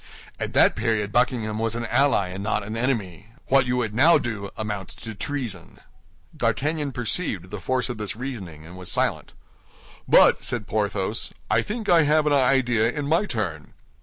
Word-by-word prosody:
At - - -4
that - - +5
period 105 -3 -1
Buckingham 115 -3 0
was 115 0 -1
an 120 0 -3
ally, 125 -7 +2
and 95 +2 -6
not 110 -1 -1
an 110 +2 -6
enemy. 110 - -2 0.2
What 135 -1 +4
you 125 0 0
would 115 -4 -1
now 155 +9 +6
do 100 -4 -4
amounts 105 -4 -4
to 110 0 -8
treason." 130 +1 -5 0.6
D'Artagnan 150 0 -1
perceived 110 - -3
the 105 - -5
force 125 +4 0
of 120 -4 -6
this 105 +1 -3
reasoning, 100 - -7
and 85 +2 -11
was 90 -1 -5
silent. - - -1 0.7
"But," - - +5
said 120 -4 -2
Porthos, 105 0 -2 0.2
"I 110 +2 +4
think 215 - -5
I 170 -2 +6
have 150 +1 +3
an 150 - +2
idea, 125 -4 +3
in 145 +3 -3
my 170 +7 +2
turn." 90 - -4
115 Hz, 175 wpm, -24 LUFS, 105-135 Hz, 0.7 s, now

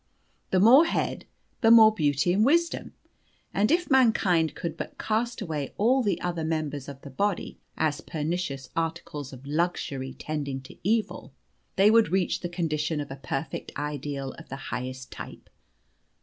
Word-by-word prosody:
The 185 - +2
more 250 - +8
head, - - -2 0.4
the 225 - +5
more 220 -2 +8
beauty 145 -1 +1
and 205 +3 +3
wisdom. 335 +7 +1 0.6
And 210 +3 +2
if 345 0 +1
mankind 195 -11 +3
could 170 - -4
but - - -7
cast 230 +2 -1
away 150 -6 -4
all 250 +6 +3
the 205 -5 0
other 170 -2 -2
members 150 -3 -2
of 140 -1 -9
the 140 - -9
body 200 +7 -2 0.2
as 150 -2 0
pernicious 155 -3 -3
articles 165 -4 -3
of 130 0 -12
luxury 145 -4 -2
tending 145 -3 -3
to 130 - -13
evil, 220 +4 -1 0.4
they 200 +2 +5
would 225 0 +5
reach 190 -1 +1
the 175 - -4
condition 160 -3 -1
of 145 -1 -5
a - - -5
perfect 135 +2 -5
ideal 145 -2 -4
of - - -13
the 135 - -5 0.2
highest 130 +2 -5
type. - - -10
165 Hz, 160 wpm, -27 LUFS, 145-210 Hz, 0.6 s, more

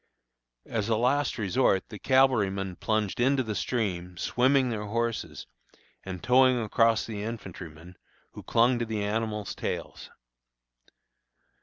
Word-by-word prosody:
As 110 -1 -2
a 110 - +3
last 130 +5 +1
resort 105 -2 +1
the 105 -3 -9
cavalrymen 100 -8 +2
plunged 110 -1 -1
into 130 +2 +3
the 110 -2 -3
stream, 95 -4 -2
swimming 130 +4 +2
their 105 -2 -3
horses, 115 +1 -3 0.6
and 95 -2 -7
towing 130 0 +4
across 115 +1 +2
the 105 -3 -5
infantrymen, 90 -6 -8 0.4
who - - -10
clung 120 +1 +2
to 115 - -1
the 110 -2 -2
animals' 105 0 -2
tails! - - -5
110 Hz, 125 wpm, -27 LUFS, 100-120 Hz, 0.6 s, towing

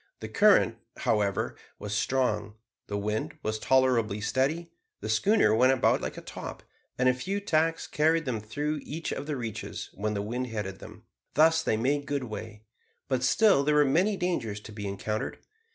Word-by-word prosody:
The - - -6
current, - - +4 0.2
however, 100 -2 0 0.2
was 105 0 -5
strong, 105 -3 0 0.3
the 100 - -2
wind 105 +2 -2
was 110 0 -2
tolerably 120 -6 +2
steady, 145 +10 0 0.3
the 110 - -5
schooner 195 - +4
went 130 +4 +5
about 130 - +2
like - - -4
a - - -6
top, - - -8 0.3
and 125 - +2
a 130 - +5
few 190 +11 -3
tacks 165 -4 +1
carried 160 +1 +2
them 125 -4 -1
through 145 +8 -3
each 160 +3 -5
of 145 - -4
the 150 -2 -2
reaches, 115 -4 -5
when 105 +1 -2
the 100 - -1
wind 125 +4 -3
headed 105 -4 -5
them. - - -12 0.3
Thus 160 +2 +5
they 110 -9 0
made 140 +5 0
good 140 -2 -1
way; 110 -1 -7 0.5
but 130 -2 +1
still 140 - +4
there 150 +1 +2
were 150 0 +5
many 185 +9 +2
dangers 125 - -2
to 110 - -11
be 105 -1 -5
encountered. 105 +2 -3
130 Hz, 180 wpm, -28 LUFS, 105-150 Hz, 0.5 s, went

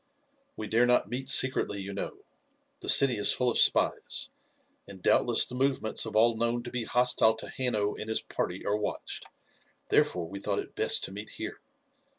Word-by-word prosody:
"We 110 - -5
dare 115 +3 +2
not 125 -3 +2
meet 130 +2 -5
secretly, 130 -7 +1
you 100 0 -6
know. 100 - -6 0.6
The - - -6
city 130 -4 +6
is 105 - +4
full 125 -1 +1
of - - 0
spies, - - +1 0.6
and 100 -1 -11
doubtless 120 +5 +3
the - - -9
movements 130 -4 0
of 110 - -8
all 115 +1 +4
known 120 +1 -1
to 120 - -8
be 125 -2 -3
hostile 125 -2 +3
to 110 - -7
Hanno 110 -5 0
and 110 - -8
his 110 - 0
party 90 +2 -4
are 105 - 0
watched, 105 -1 -5 0.6
therefore 85 -2 +1
we 100 +3 -8
thought 100 0 -2
it - - -5
best - - +2
to - - -4
meet 105 +2 -8
here. - - -6
110 Hz, 185 wpm, -28 LUFS, 105-125 Hz, 0.6 s, city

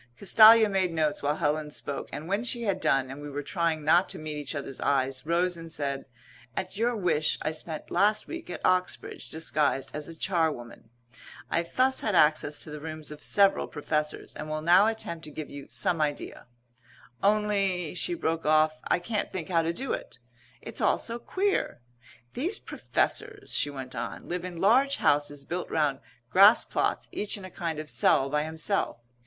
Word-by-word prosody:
Castalia 220 +2 +8
made 190 -3 0
notes 155 -2 0
while 145 +1 0
Helen 150 0 -1
spoke, 145 -1 -5
and 150 +3 -6
when 200 +5 0
she 240 -1 -1
had 195 -4 -1
done, 130 -1 +1
and 140 +2 -8
we 145 - -7
were 145 +1 -4
trying 165 -2 -1
not 170 +4 +4
to 190 - -2
meet 155 -2 -5
each 145 0 -4
other's 135 -2 -6
eyes, 135 0 0
rose 175 +2 +1
and 165 -1 -9
said, 140 -3 -3 0.5
"At 190 0 -3
your 235 +3 +1
wish 165 -7 +1
I 155 - 0
spent 155 0 -5
last 210 +1 +2
week 335 0 -7
at - - -5
Oxbridge, 185 0 -1
disguised 150 -4 0
as 150 0 -4
a 165 - -9
charwoman. 160 -11 -2 0.6
I 170 - +2
thus 255 +10 +1
had 210 -4 0
access 150 -2 +3
to 155 - -8
the 150 - -6
rooms 155 0 -6
of 150 0 -10
several 200 -1 +3
Professors 150 0 -3
and 155 - -6
will 155 0 -3
now 180 +5 +6
attempt 170 -7 -3
to - - -7
give 150 0 -7
you 140 -1 -9
some 170 -3 0
idea 145 -5 -3 0.7
only," 200 -5 +1
she 265 - -2
broke 165 - -1
off, 155 0 +3
"I - - +2
can't 210 +4 -3
think 180 -3 -5
how 170 -2 +3
to 165 0 0
do 260 +9 -3
it. - - -6 0.5
It's - - -5
all - - +3
so 235 0 -4
queer. 385 - -1 0.5
These 345 - -1
Professors," 425 -1 -2
she 145 - +1
went 130 -2 -7
on, 120 -1 -6
"live 180 +1 -3
in 180 -2 -7
large 260 +9 +4
houses 145 -1 +1
built 175 +1 -4
round 150 -4 +1 0.3
grass 200 +4 +7
plots - - -1
each 210 +1 -3
in 195 - -9
a 185 - -10
kind 165 -3 -3
of 155 0 -5
cell 135 +1 +3
by 150 0 +1
himself. 160 - -2
165 Hz, 190 wpm, -28 LUFS, 150-195 Hz, 0.7 s, Castalia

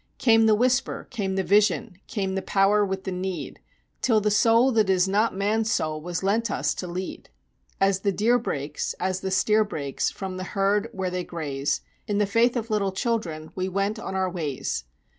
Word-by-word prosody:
Came 225 -2 +5
the 215 - +5
Whisper, 250 +3 +1
came 200 -6 -2
the 190 - +1
Vision, 200 +1 +2
came 195 -3 -2
the 190 - -1
Power 200 +2 +3
with 190 -1 -2
the 190 - -4
Need, 185 0 -4 0.4
Till 225 -4 +3
the 210 0 +1
Soul 230 +4 +4
that 220 -4 +2
is 185 0 +3
not 205 +2 +1
man's 220 +3 +1
soul 155 -1 -1
was 175 +3 -4
lent 220 +4 +1
us - - 0
to 180 - -5
lead. 180 +2 -6 0.5
As 195 0 +3
the 200 +1 +1
deer 230 +5 +2
breaks 145 - -3
as 185 0 -1
the 190 - -3
steer 215 +3 +3
breaks 145 -10 -2
from 190 -1 -6
the 185 - -4
herd 200 +3 +2
where 190 -4 -3
they 180 0 -2
graze, 145 -5 -2 0.3
In 205 - 0
the 210 - +3
faith 230 +5 +2
of 230 -2 -3
little 200 -2 +1
children 185 -7 -2
we 185 0 -2
went 200 +3 -1
on 190 -4 -5
our 190 0 +1
ways. 150 - -3
195 Hz, 200 wpm, -25 LUFS, 185-215 Hz, 0.5 s, Came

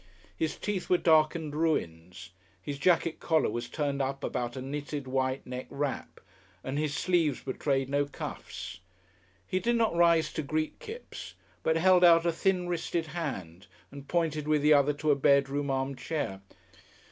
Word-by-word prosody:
His 160 -1 -2
teeth 200 -4 -3
were 180 - +5
darkened 155 -2 +2
ruins. 90 - -2 0.3
His 140 +9 -6
jacket 165 0 +2
collar 160 -8 +2
was 120 +1 -4
turned 140 -2 -1
up 135 0 -3
about 120 0 -2
a - - -4
knitted 145 +1 -4
white 130 0 -1
neck 125 0 -6
wrap, 140 -1 -4 0.4
and 135 +2 -2
his 150 -2 -1
sleeves 165 -7 +1
betrayed 135 0 -1
no 140 +1 +1
cuffs. 120 -7 -7 0.7
He 185 - -1
did 235 +6 +1
not 225 -6 +2
rise 170 -1 +4
to - - -2
greet 155 +2 -2
Kipps, 470 0 -9 0.3
but 160 0 +2
held 180 +1 +5
out 170 -1 +7
a 170 - +3
thin 180 +1 0
wristed 170 -1 -2
hand 95 - -5 0.2
and 140 0 -10
pointed 155 -3 0
with 150 -1 +2
the 150 0 +6
other 145 0 +4
to 150 +1 0
a - - +4
bedroom 140 +1 +2
arm 135 0 -1
chair. 125 -10 -3
150 Hz, 165 wpm, -29 LUFS, 135-165 Hz, 0.7 s, out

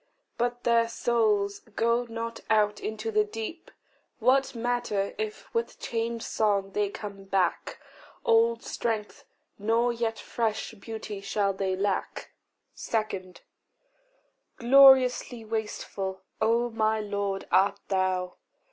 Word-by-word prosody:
But 245 0 -2
their 230 -1 +3
souls 215 -4 +1 0.2
go 235 +1 +2
not 230 0 -5
out 210 -1 +3
into 220 +1 -4
the 215 0 +3
deep. 225 +10 -7 0.5
What 260 +3 +2
matter 235 -4 -1
if 435 0 -5
with 465 0 -2
changed 230 0 -3
song 200 -3 +1
they 205 0 0
come 200 -1 -8
back? 190 -3 0 0.5
Old 230 +1 +3
strength 220 -3 -3 0.3
nor 230 +3 +2
yet 230 -1 -2
fresh 225 -1 -2
beauty 220 -1 -7
shall 200 0 0
they 190 -1 -1
lack. 195 0 -2 0.4
2. 195 -5 -3 1.2
Gloriously 255 -2 +6
wasteful, 210 -3 -4 0.2
O 235 +2 +2
my 220 0 +1
Lord, 200 -2 -2
art 200 +1 +3
thou! 185 -1 0
220 Hz, 110 wpm, -28 LUFS, 200-235 Hz, 1.2 s, Gloriously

